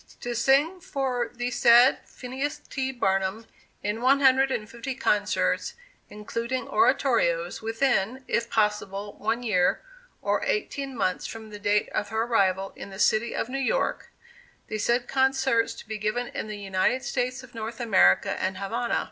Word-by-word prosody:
To 245 Hz, -, -3 dB
sing 275 Hz, +9 st, +2 dB
for 255 Hz, -6 st, -2 dB
the 245 Hz, 0 st, -3 dB
said 240 Hz, +2 st, +6 dB
Phineas 265 Hz, +4 st, -4 dB
T. 265 Hz, -1 st, -4 dB
Barnum 195 Hz, -2 st, -1 dB, 0.4 s
in 210 Hz, +2 st, -2 dB
one 270 Hz, +3 st, +4 dB
hundred 265 Hz, 0 st, +5 dB
and 215 Hz, -5 st, -3 dB
fifty 235 Hz, +4 st, -6 dB
concerts, 210 Hz, -4 st, 0 dB, 0.3 s
including 230 Hz, +4 st, -4 dB
oratorios, -, -, +2 dB
within 225 Hz, +1 st, 0 dB
(if 235 Hz, 0 st, -1 dB
possible) 210 Hz, -2 st, -1 dB
one 225 Hz, +3 st, -1 dB
year, 185 Hz, -6 st, +1 dB, 0.4 s
or -, -, 0 dB
eighteen 280 Hz, -, -2 dB
months 185 Hz, -4 st, -1 dB
from 220 Hz, -1 st, -9 dB
the 210 Hz, -, -8 dB
date 205 Hz, +1 st, +1 dB
of 205 Hz, -, -2 dB
her 220 Hz, +1 st, 0 dB
arrival 195 Hz, -5 st, +1 dB
in -, -, -9 dB
the 195 Hz, -, -10 dB
City 215 Hz, +3 st, +2 dB
of -, -, -2 dB
New 270 Hz, +2 st, -3 dB
York 275 Hz, -, -1 dB, 0.6 s
the 215 Hz, -, -3 dB
said 240 Hz, +3 st, +1 dB
concerts 265 Hz, -4 st, +1 dB
to -, -, -12 dB
be 215 Hz, -1 st, -5 dB
given 225 Hz, +4 st, -1 dB
in -, -, -5 dB
the 215 Hz, -1 st, -6 dB
United 200 Hz, +6 st, 0 dB
States 255 Hz, +1 st, -2 dB
of 255 Hz, -, -15 dB
North 225 Hz, 0 st, -6 dB
America 190 Hz, -, +4 dB
and 185 Hz, 0 st, -1 dB
Havana. 230 Hz, +5 st, -1 dB
235 Hz, 160 wpm, -26 LUFS, 210-260 Hz, 0.6 s, said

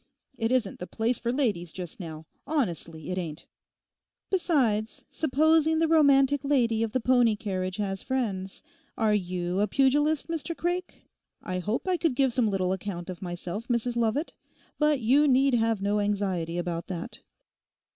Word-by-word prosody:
It 225 Hz, -1 st, -1 dB
isn't 240 Hz, -7 st, 0 dB
the 180 Hz, -, -6 dB
place 230 Hz, +2 st, -1 dB
for 235 Hz, 0 st, -1 dB
ladies 210 Hz, -, 0 dB
just 180 Hz, +1 st, -8 dB
now—honestly 165 Hz, -, -4 dB
it 185 Hz, -, -1 dB
ain't.' 160 Hz, -3 st, -6 dB, 0.9 s
'Besides, 255 Hz, -, +1 dB
supposing 315 Hz, +2 st, +3 dB
the 325 Hz, 0 st, +2 dB
romantic 285 Hz, -3 st, +4 dB
lady 240 Hz, -6 st, +2 dB
of 225 Hz, -1 st, 0 dB
the 255 Hz, -, +2 dB
pony 245 Hz, -2 st, +3 dB
carriage 185 Hz, -3 st, -3 dB
has 195 Hz, -2 st, -2 dB
friends? 200 Hz, -8 st, -3 dB, 0.3 s
Are 220 Hz, -2 st, +2 dB
you 180 Hz, -2 st, -1 dB
a 210 Hz, -, +2 dB
pugilist, 290 Hz, +6 st, +2 dB
Mr 330 Hz, 0 st, -4 dB
Craik?' 355 Hz, +1 st, -3 dB, 0.4 s
'I 185 Hz, 0 st, -3 dB
hope 210 Hz, -, -2 dB
I 365 Hz, -1 st, +2 dB
could 325 Hz, -6 st, 0 dB
give 265 Hz, -2 st, +2 dB
some 235 Hz, -4 st, +2 dB
little 185 Hz, -2 st, 0 dB
account 185 Hz, -2 st, -5 dB
of 175 Hz, -, -10 dB
myself, 180 Hz, +4 st, -5 dB
Mrs 240 Hz, 0 st, 0 dB
Lovat; 235 Hz, +7 st, 0 dB, 0.5 s
but 300 Hz, -3 st, +2 dB
you 275 Hz, +7 st, +4 dB
need 270 Hz, 0 st, +4 dB
have 225 Hz, -3 st, +1 dB
no 205 Hz, +1 st, +1 dB
anxiety 195 Hz, -5 st, -1 dB
about 170 Hz, -1 st, -3 dB
that. 180 Hz, +5 st, -6 dB
225 Hz, 155 wpm, -27 LUFS, 185-275 Hz, 0.9 s, romantic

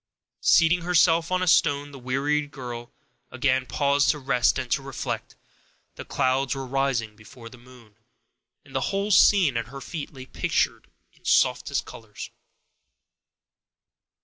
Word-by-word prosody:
Seating 165 Hz, +1 st, +4 dB
herself 165 Hz, -1 st, +3 dB
on 185 Hz, 0 st, +1 dB
a -, -, -2 dB
stone, 145 Hz, -3 st, +2 dB
the 140 Hz, -, -11 dB
wearied 140 Hz, +4 st, -1 dB
girl 120 Hz, -3 st, -8 dB, 0.4 s
again 130 Hz, 0 st, 0 dB
paused 140 Hz, 0 st, +1 dB
to 150 Hz, -, +2 dB
rest 130 Hz, -3 st, +1 dB
and 130 Hz, -2 st, -5 dB
to -, -, +1 dB
reflect; 135 Hz, -1 st, -5 dB, 0.6 s
the -, -, -9 dB
clouds 135 Hz, 0 st, 0 dB
were 135 Hz, 0 st, -5 dB
rising 130 Hz, -5 st, -1 dB
before 115 Hz, +2 st, -13 dB
the 125 Hz, -, -15 dB
moon, 120 Hz, -4 st, -18 dB, 0.7 s
and -, -, -17 dB
the -, -, 0 dB
whole 200 Hz, +2 st, -2 dB
scene 185 Hz, -, +5 dB
at 115 Hz, -1 st, -3 dB
her 135 Hz, +3 st, -9 dB
feet 150 Hz, +2 st, -7 dB
lay 130 Hz, -3 st, -11 dB
pictured -, -, -2 dB, 0.2 s
in -, -, -28 dB
softest -, -, +1 dB
colors. 105 Hz, -2 st, -10 dB
135 Hz, 145 wpm, -25 LUFS, 125-150 Hz, 0.7 s, scene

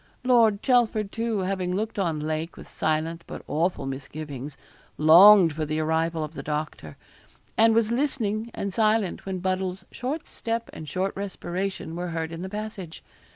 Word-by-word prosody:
Lord 230 Hz, -5 st, +4 dB
Chelford, 225 Hz, -5 st, +2 dB
too, 225 Hz, -3 st, -1 dB
having 185 Hz, -1 st, -1 dB
looked 215 Hz, +1 st, -2 dB
on 165 Hz, -5 st, 0 dB
Lake 155 Hz, +2 st, -3 dB
with -, -, -11 dB
silent, 160 Hz, +2 st, -1 dB
but -, -, -8 dB
awful 165 Hz, -2 st, 0 dB
misgivings, 135 Hz, 0 st, -6 dB, 0.4 s
longed 170 Hz, +2 st, +8 dB
for 155 Hz, +1 st, -3 dB
the 155 Hz, +1 st, -2 dB
arrival 160 Hz, +1 st, 0 dB
of 155 Hz, +1 st, -6 dB
the -, -, -6 dB
doctor; 150 Hz, -, -4 dB, 0.6 s
and 225 Hz, 0 st, +5 dB
was 230 Hz, -1 st, +2 dB
listening 235 Hz, -4 st, -1 dB
and 200 Hz, -1 st, -3 dB
silent 215 Hz, -4 st, +1 dB
when 190 Hz, -1 st, -2 dB
Buddle's 185 Hz, 0 st, -2 dB
short 285 Hz, +6 st, -4 dB
step 230 Hz, 0 st, -4 dB
and 155 Hz, -2 st, -8 dB
short 190 Hz, +1 st, -1 dB
respiration 190 Hz, -3 st, -4 dB
were 175 Hz, +1 st, -3 dB
heard 165 Hz, -1 st, -3 dB
in 165 Hz, 0 st, -6 dB
the 190 Hz, -, -5 dB
passage. 210 Hz, -5 st, -6 dB
185 Hz, 160 wpm, -26 LUFS, 160-215 Hz, 0.6 s, longed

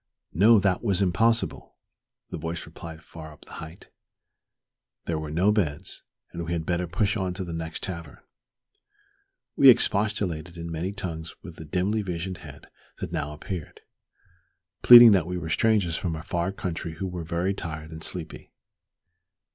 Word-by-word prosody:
No, 110 Hz, +8 st, +6 dB
that 95 Hz, 0 st, +1 dB
was 100 Hz, -5 st, +1 dB
impossible, 110 Hz, +5 st, +1 dB, 0.6 s
"the 90 Hz, -, -4 dB
voice 80 Hz, +2 st, -4 dB
replied 80 Hz, 0 st, -10 dB
far 80 Hz, -1 st, -10 dB
up 75 Hz, -, -17 dB
the -, -, -15 dB
height;" 80 Hz, +2 st, -11 dB, 1.1 s
there 80 Hz, -2 st, -2 dB
were 75 Hz, -1 st, -5 dB
no 90 Hz, +7 st, +2 dB
beds, 90 Hz, -5 st, -2 dB, 0.3 s
and 85 Hz, -, -5 dB
we 85 Hz, +1 st, -3 dB
had 80 Hz, -2 st, -2 dB
better 90 Hz, +1 st, -1 dB
push 100 Hz, +5 st, 0 dB
on 95 Hz, -3 st, -2 dB
to 95 Hz, -, -4 dB
the 85 Hz, -2 st, -6 dB
next 80 Hz, 0 st, -5 dB
tavern. 85 Hz, -6 st, -5 dB, 1.4 s
We 135 Hz, -, +8 dB
expostulated 100 Hz, -8 st, +2 dB
in 85 Hz, 0 st, -6 dB
many 85 Hz, +4 st, -3 dB
tongues 85 Hz, -5 st, -6 dB
with 85 Hz, -5 st, -10 dB
the 80 Hz, -, -9 dB
dimly 95 Hz, +7 st, 0 dB
visioned 90 Hz, -1 st, -4 dB
head -, -, -12 dB, 0.3 s
that -, -, -6 dB
now 75 Hz, -, -3 dB
appeared, 80 Hz, +2 st, -7 dB, 1.0 s
pleading 120 Hz, -2 st, +11 dB
that 90 Hz, -5 st, +3 dB
we 90 Hz, 0 st, -3 dB
were 80 Hz, -2 st, -5 dB
strangers 100 Hz, -4 st, +2 dB
from 85 Hz, -3 st, -2 dB
a 80 Hz, -, -7 dB
far 85 Hz, +2 st, -2 dB
country 85 Hz, -4 st, -5 dB
who 80 Hz, +4 st, -5 dB
were 90 Hz, -2 st, -5 dB
very 85 Hz, +4 st, -1 dB
tired 80 Hz, -4 st, -6 dB
and 80 Hz, 0 st, -9 dB
sleepy. 85 Hz, -3 st, -6 dB
85 Hz, 165 wpm, -26 LUFS, 80-95 Hz, 1.4 s, pleading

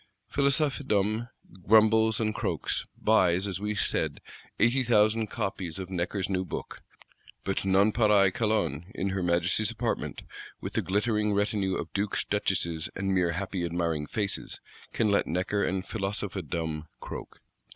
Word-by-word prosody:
Philosophedom 130 Hz, -6 st, +1 dB, 0.4 s
grumbles 110 Hz, +1 st, +5 dB
and 110 Hz, -1 st, 0 dB
croaks; -, -, -2 dB
buys, 95 Hz, -4 st, +3 dB
as 95 Hz, -2 st, -3 dB
we 105 Hz, +1 st, -2 dB
said, -, -, 0 dB, 0.4 s
80,000 115 Hz, -2 st, +3 dB
copies 95 Hz, -4 st, -3 dB
of 95 Hz, -1 st, -6 dB
Necker's 90 Hz, +1 st, -1 dB
new 95 Hz, -1 st, 0 dB
Book: 90 Hz, -, -6 dB, 0.6 s
but 95 Hz, -, -1 dB
Nonpareil 100 Hz, 0 st, +4 dB
Calonne, 105 Hz, -, 0 dB
in 95 Hz, -, -1 dB
her 95 Hz, 0 st, -2 dB
Majesty's 90 Hz, +4 st, +2 dB
Apartment, 115 Hz, +1 st, -3 dB, 0.4 s
with -, -, -6 dB
the -, -, +1 dB
glittering 105 Hz, +1 st, +1 dB
retinue 100 Hz, -2 st, +1 dB
of -, -, -5 dB
Dukes, 100 Hz, 0 st, 0 dB
Duchesses, 85 Hz, -6 st, -1 dB
and 95 Hz, 0 st, -1 dB
mere 90 Hz, -2 st, +2 dB
happy 95 Hz, 0 st, -3 dB
admiring 85 Hz, -3 st, -1 dB
faces, 100 Hz, -3 st, -2 dB, 0.3 s
can 110 Hz, -3 st, +1 dB
let 100 Hz, -, +2 dB
Necker 90 Hz, +5 st, 0 dB
and 95 Hz, 0 st, -1 dB
Philosophedom 90 Hz, -6 st, -3 dB
croak. -, -, -8 dB
100 Hz, 130 wpm, -28 LUFS, 90-110 Hz, 0.6 s, grumbles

